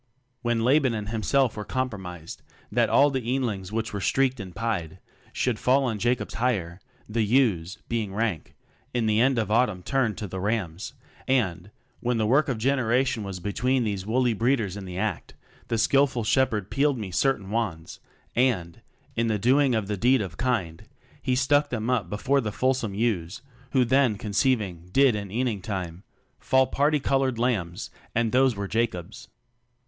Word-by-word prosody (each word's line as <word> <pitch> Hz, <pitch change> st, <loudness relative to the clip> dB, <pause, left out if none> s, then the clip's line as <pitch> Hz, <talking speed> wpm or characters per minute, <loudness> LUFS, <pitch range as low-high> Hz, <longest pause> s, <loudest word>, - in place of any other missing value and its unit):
When 120 Hz, -2 st, 0 dB
Laban 130 Hz, -1 st, +3 dB
and 105 Hz, -1 st, -4 dB
himself 115 Hz, +3 st, +1 dB
were 105 Hz, -, -4 dB
compromised 95 Hz, -10 st, -5 dB, 0.3 s
That -, -, +2 dB
all 145 Hz, +1 st, +5 dB
the 130 Hz, -1 st, -1 dB
eanlings 115 Hz, -6 st, -2 dB
which 110 Hz, 0 st, -3 dB
were 100 Hz, -, -3 dB
streaked 130 Hz, +3 st, +1 dB
and 95 Hz, -4 st, -8 dB
pied 100 Hz, -6 st, -2 dB, 0.3 s
Should 120 Hz, -4 st, -1 dB
fall 135 Hz, +1 st, +3 dB
as 105 Hz, -, -5 dB
Jacob's 120 Hz, +3 st, 0 dB
hire, 100 Hz, -8 st, -1 dB, 0.3 s
the 115 Hz, +2 st, -1 dB
ewes, 105 Hz, -6 st, +2 dB
being 110 Hz, -4 st, -2 dB
rank, 105 Hz, -5 st, -2 dB, 0.4 s
In 120 Hz, -2 st, +1 dB
the 110 Hz, +1 st, +3 dB
end 130 Hz, 0 st, +3 dB
of 110 Hz, -2 st, -1 dB
autumn 110 Hz, -6 st, +2 dB
turned 125 Hz, -4 st, 0 dB
to 105 Hz, -, -4 dB
the 95 Hz, -1 st, -6 dB
rams, 100 Hz, +1 st, -2 dB, 0.3 s
And, 100 Hz, -9 st, 0 dB, 0.3 s
when 120 Hz, 0 st, 0 dB
the 110 Hz, -, +1 dB
work 140 Hz, +7 st, +3 dB
of 125 Hz, -, -1 dB
generation 130 Hz, 0 st, +1 dB
was 95 Hz, -2 st, -5 dB
Between 125 Hz, +7 st, 0 dB
these 100 Hz, -4 st, -2 dB
woolly 120 Hz, +3 st, +1 dB
breeders 115 Hz, -3 st, 0 dB
in 100 Hz, -1 st, -7 dB
the 90 Hz, -1 st, -7 dB
act, 105 Hz, -2 st, -3 dB, 0.3 s
The 115 Hz, -, -1 dB
skilful 130 Hz, +1 st, +2 dB
shepherd 110 Hz, -4 st, +1 dB
peel'd 140 Hz, -1 st, +2 dB
me 105 Hz, -5 st, -5 dB
certain 100 Hz, -1 st, 0 dB
wands 95 Hz, -8 st, -3 dB, 0.4 s
And, 105 Hz, -10 st, 0 dB, 0.3 s
in 115 Hz, 0 st, +1 dB
the 110 Hz, -1 st, +1 dB
doing 130 Hz, +4 st, +3 dB
of 110 Hz, -2 st, 0 dB
the 105 Hz, 0 st, -3 dB
deed 125 Hz, +2 st, +3 dB
of 90 Hz, -4 st, -7 dB
kind, 95 Hz, -9 st, -2 dB, 0.4 s
He 130 Hz, -, 0 dB
stuck 145 Hz, +3 st, +2 dB
them 120 Hz, 0 st, -2 dB
up 110 Hz, -9 st, 0 dB
before 130 Hz, +8 st, +1 dB
the 105 Hz, -3 st, -3 dB
fulsome 125 Hz, -3 st, 0 dB
ewes, 105 Hz, -2 st, -1 dB, 0.3 s
Who 130 Hz, -2 st, +4 dB
then 130 Hz, -3 st, +3 dB
conceiving 100 Hz, -5 st, -1 dB
did 135 Hz, +2 st, +5 dB
in 100 Hz, -2 st, -4 dB
eaning 115 Hz, -1 st, -1 dB
time 90 Hz, -5 st, -5 dB
TECHNOCRACY -, -, -41 dB
27 -, -, -25 dB
Fall 130 Hz, 0 st, +5 dB
parti 145 Hz, +3 st, +1 dB
colored 135 Hz, -2 st, +1 dB
lambs, 105 Hz, -6 st, -1 dB, 0.2 s
and 115 Hz, -1 st, +1 dB
those 130 Hz, -1 st, +3 dB
were 100 Hz, 0 st, -4 dB
Jacob's. 110 Hz, -4 st, -3 dB
115 Hz, 175 wpm, -26 LUFS, 100-130 Hz, 0.4 s, all